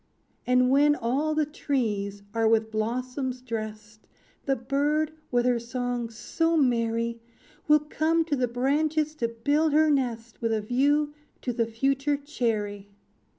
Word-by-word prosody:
"And 250 0 +4
when 290 +2 +5
all 275 +5 0
the 305 -1 +2
trees 210 -9 -2
are 225 -1 +2
with 220 0 +2
blossoms 250 +4 -2
drest, 215 -3 -7 0.4
The 270 - +3
bird, 290 +5 0 0.2
with 245 -1 +1
her 245 -1 +2
song 245 0 -3
so 330 +8 0
merry, 230 -3 +1 0.5
Will 300 0 +6
come 320 +2 +1
to 305 -3 0
the 250 -2 +1
branches 300 +5 0
to 235 - 0
build 285 +7 +1
her 310 0 +5
nest, 235 -5 -2
With 230 -1 +1
a 215 - 0
view 285 +6 +1 0.3
to 245 - -1
the 230 -1 0
future 275 +5 0
cherry. 215 -8 -2
250 Hz, 145 wpm, -27 LUFS, 230-290 Hz, 0.5 s, Will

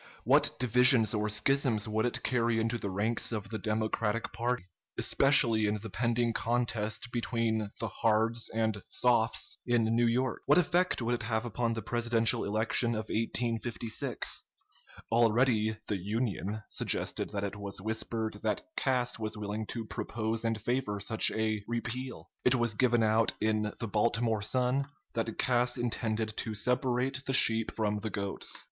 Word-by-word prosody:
What - - +3
divisions 125 -1 +5
or 105 0 0
schisms 115 0 +1
would 110 +2 0
it - - -4
carry 120 -2 +1
into 115 +1 -1
the 100 - -3
ranks 105 +6 0
of 105 -2 -4
the 110 - -3
Democratic 110 +1 -1
party, 120 -3 -1 0.3
especially 115 -6 +3
in 105 +1 0
the 110 0 -8
pending 120 +2 0
contest 115 0 -1
between 115 -3 -1
the 115 - -1
"Hards" 115 +2 0
and 110 -2 -1
"Softs" 120 -2 +1
in 120 -2 +2
New 120 0 +3
York? 125 +2 0
What 145 - +6
effect 180 -4 +2
would 120 +1 0
it 120 - -1
have 110 +1 -1
upon 115 -1 -1
the 115 - -4
presidential 120 0 +2
election 115 +3 +1
of 110 0 -4
1856? 115 0 -1 0.7
Already 115 -1 +3
the 105 - 0
"Union" 105 +1 -2
suggested - - -1
that 100 -1 -3
it 100 0 -3
was 100 -1 -5
whispered 110 +1 -2
that - - -1
Cass 125 -3 0
was 110 0 -3
willing 105 +1 -4
to 115 -2 -5
propose 110 +1 -3
and 115 -1 -1
favor 110 -2 -1
such 110 +3 +2
a 110 -1 -1
"repeal." 120 +2 -5
It 125 - +4
was 120 -2 +1
given 120 0 +2
out 110 +1 +2
in 110 0 0
the 115 - -3
"Baltimore 115 +1 +1
Sun" 130 +5 +1 0.3
that 115 -1 -2
Cass 125 -1 +1
intended 110 -2 -2
to 110 -2 -3
"separate 125 +4 0
the 135 - 0
sheep 115 -3 +5
from 105 -1 0
the 110 - -4
goats." 100 -2 -3
115 Hz, 155 wpm, -30 LUFS, 110-120 Hz, 0.7 s, What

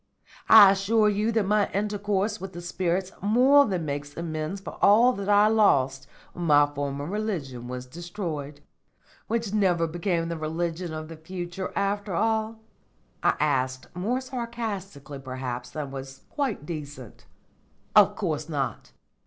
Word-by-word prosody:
I 205 -3 +10
assure 210 +2 +2
you 210 +2 0
that 220 -3 +2
my 210 +1 +2
intercourse 205 +1 -1
with 190 0 -7
the 175 - -7
spirits 180 +1 -2
more 260 +7 +5
than 180 -5 -2
makes 145 0 -5
amends 160 +2 -4
for 195 - -9
all 230 +5 +6
that 200 -2 -5
I 205 +1 +6
lost 135 -12 +2 0.3
when 175 - -5
my 145 -2 +6
former 145 -1 -4
religion 165 - -4
was 125 0 -6
destroyed." 155 -2 -6 0.7
"Which 225 -3 -2
never 180 -5 +2
became 170 +1 -1
the 170 0 -4
religion 165 +2 -3
of 155 0 -6
the 165 0 -10
future 175 +2 -6
after 200 -1 -1
all?" 220 +2 0 0.7
I - - +3
asked, 130 -3 -1
more 225 +9 -1
sarcastically 220 - -5
perhaps 130 -2 -5
than 145 +1 -5
was 135 0 -8
quite 265 - -2
decent. 145 - -8 0.7
"Of - - +6
course - - -3
not. - - -3
175 Hz, 145 wpm, -26 LUFS, 145-210 Hz, 0.7 s, I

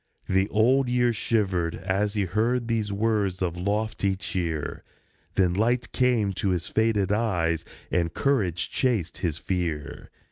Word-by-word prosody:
The 95 +2 +2
Old 125 +4 +3
Year 120 -1 +2
shivered 95 -7 0
as 100 +2 -1
he 100 -2 +1
heard 115 +6 0
these 110 -3 0
words 100 -3 0
of 85 -2 -1
lofty 100 +1 0
cheer; 85 -5 -3 0.5
Then 90 -2 +3
light 120 +5 +1
came 120 -6 +2
to 95 +2 -1
his 90 -3 0
faded 110 -3 +1
eyes, 85 -7 +1 0.3
and 85 -2 +1
courage 100 - 0
chased 110 - 0
his 80 -4 -1
fear. 80 -6 -3
100 Hz, 140 wpm, -26 LUFS, 90-115 Hz, 0.5 s, Old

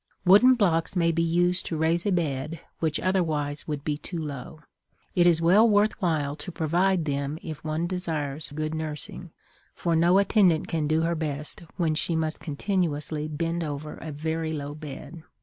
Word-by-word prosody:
Wooden 210 +8 +7
blocks 175 -6 +1
may 170 -2 +3
be 165 0 0
used 175 +2 +2
to 160 - -2
raise 165 +4 +1
a - - +2
bed 155 -2 -1 0.2
which 160 -2 0
otherwise 155 -6 0
would 150 -2 -3
be 150 -1 -2
too 175 - -6
low. 150 0 -6 0.5
It 175 -1 +4
is 165 -1 +3
well 205 +7 +6
worth 210 +1 +2
while 150 -5 0
to 155 +4 -7
provide 175 +2 +1
them 140 0 -2
if 155 -3 -7
one 155 +2 -1
desires 160 -5 -2
good 155 0 -2
nursing, 160 +2 -5 0.5
for 170 -1 0
no 170 +3 +4
attendant 195 -5 +3
can 155 -2 -1
do 155 +1 +2
her 165 +1 +1
best 150 -2 -2 0.2
when 165 -3 +1
she 165 +2 -1
must 160 -1 -1
continuously 155 -2 -2
bend 165 +2 -2
over 150 0 -5
a 160 - -7
very 160 +2 -2
low 145 -1 -4
bed. 155 +2 -9
160 Hz, 175 wpm, -26 LUFS, 150-175 Hz, 0.5 s, Wooden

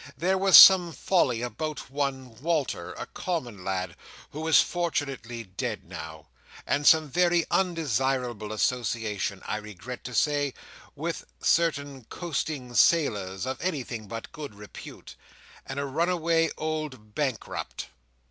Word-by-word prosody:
There 185 +3 +1
was 190 -1 +7
some 180 -3 +9
folly 130 -13 +1
about 140 +5 -5
one 135 -3 -3
Walter, 150 - -1
a - - -6
common 125 - -4
lad, 95 -2 -3 0.4
who 155 +2 -5
is 160 - +7
fortunately 135 -9 -2
dead 95 -3 -4
now: 80 -3 -9 0.4
and 145 0 +1
some 160 -1 +6
very 175 +3 +2
undesirable 130 - 0
association, 110 -3 -1
I 105 - -2
regret 105 +3 -8
to 125 0 -6
say, 145 -3 +1 0.4
with - - -4
certain 145 -6 +1
coasting 145 -5 -4
sailors, 105 - +2
of 130 +1 -4
anything 130 - -3
but 115 +3 -7
good 145 -8 -8
repute, 105 0 -11 0.5
and 135 +1 -4
a 140 - -1
runaway 165 +2 +1
old 155 -9 -4
bankrupt." 130 -3 -3
135 Hz, 125 wpm, -27 LUFS, 110-160 Hz, 0.5 s, some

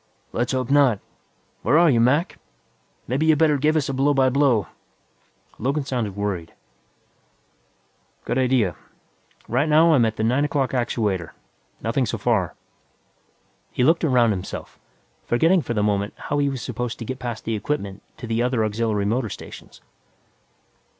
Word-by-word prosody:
"Let's 120 +1 -1
hope 130 0 -1
not. 140 -7 +4 0.6
Where 150 - +3
are 170 +1 +6
you, 120 - +3
Mac? 145 +9 +2 0.7
Maybe 140 +6 0
you 160 - +6
better 150 -2 +3
give 155 +3 +2
us 150 -3 +1
a 135 - -2
blow 140 +2 +2
by 130 -1 +4
blow." 130 -7 +3 0.9
Logan 140 +4 -1
sounded 120 -7 -3
worried. 100 -5 -4 1.7
"Good 130 - 0
idea. 125 -8 +2 0.7
Right 140 +7 +1
now 160 +2 +5
I'm 130 -6 +4
at 110 -1 -1
the 110 - -2
nine 125 +6 +2
o'clock 140 -2 0
actuator. 105 -8 -1 0.5
Nothing - - 0
so - - -2
far." - - 0 1.2
He - - 0
looked 165 +6 +3
around 125 -7 +3
himself, 95 -3 -6 0.5
forgetting 165 +9 +3
for 120 - -4
the 105 - +1
moment 100 0 0
how 145 - -2
he 140 -1 +2
was 135 -3 -5
supposed 125 -2 -4
to 115 - -7
get 130 +3 -5
past 120 -3 -5
the 115 - -1
equipment 100 -3 -3 0.2
to - - -7
the 115 0 -1
other 125 -2 +1
auxiliary 105 -1 -1
motor 115 +2 0
stations. - - -11
125 Hz, 155 wpm, -23 LUFS, 110-145 Hz, 1.7 s, are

